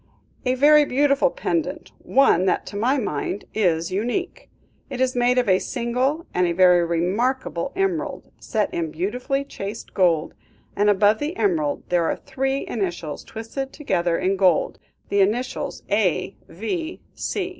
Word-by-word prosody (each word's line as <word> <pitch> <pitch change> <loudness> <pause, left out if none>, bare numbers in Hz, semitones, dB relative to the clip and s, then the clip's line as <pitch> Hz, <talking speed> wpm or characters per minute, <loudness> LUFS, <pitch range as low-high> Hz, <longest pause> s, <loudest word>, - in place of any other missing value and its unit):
"A 255 - +2
very 300 +3 +6
beautiful 280 - +2
pendant, - - -3
one 260 -10 +3
that, 190 - +1
to - - -9
my 245 +7 +2
mind, 205 - -3
is 170 -5 +1
unique. 245 - -3 0.4
It 255 - -5
is 255 -1 +1
made 245 +1 +2
of 250 - +2
a 185 -1 +4
single 260 +6 -1
and 180 -1 +2
very 180 -2 +6
remarkable 185 +6 -1
emerald, 385 -4 -2
set 215 -3 -1
in 165 -2 -2
beautifully 245 - -2
chased 215 -5 -7
gold, 170 -4 +2 0.4
and 205 +1 +3
above 205 +1 +4
the 310 +6 -3
emerald 310 -7 0
there 175 -2 +2
are - - 0
three 270 0 -2
initials 175 -8 -3
twisted 245 +5 -6
together 175 - 0
in 190 +1 0
gold; 185 -3 +2 0.3
the 200 0 +3
initials 225 +6 -1
A.V. 210 - -2
225 Hz, 140 wpm, -23 LUFS, 185-275 Hz, 0.4 s, very